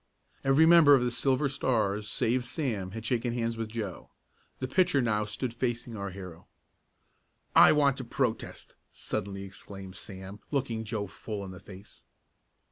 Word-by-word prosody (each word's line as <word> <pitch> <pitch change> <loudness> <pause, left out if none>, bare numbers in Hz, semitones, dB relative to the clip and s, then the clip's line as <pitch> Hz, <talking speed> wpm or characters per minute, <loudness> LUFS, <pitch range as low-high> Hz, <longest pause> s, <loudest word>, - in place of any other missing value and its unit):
Every 135 +4 +5
member 165 -4 +8
of 125 - +2
the 125 - 0
Silver 135 +3 +1
Stars 110 -6 0
save 120 +4 +1
Sam 120 - -3
had 110 +3 -7
shaken 120 0 0
hands 115 -1 -1
with 115 -1 -4
Joe. 110 -5 -5 0.5
The 130 - -3
pitcher 180 +1 +3
now 105 -4 +1
stood 115 +4 -4
facing 120 -1 -3
our 100 -1 -4
hero. 90 -3 -10 1.1
"I - - +9
want 140 -3 +3
to 130 - -4
protest!" 120 -1 -3 0.2
suddenly 100 0 -4
exclaimed 95 -1 -10
Sam, 95 +1 -9
looking 120 -6 -1
Joe 105 -1 -2
full 100 +1 -6
in 95 - -8
the 95 - -10
face. 100 +1 -14
115 Hz, 155 wpm, -29 LUFS, 100-130 Hz, 1.1 s, I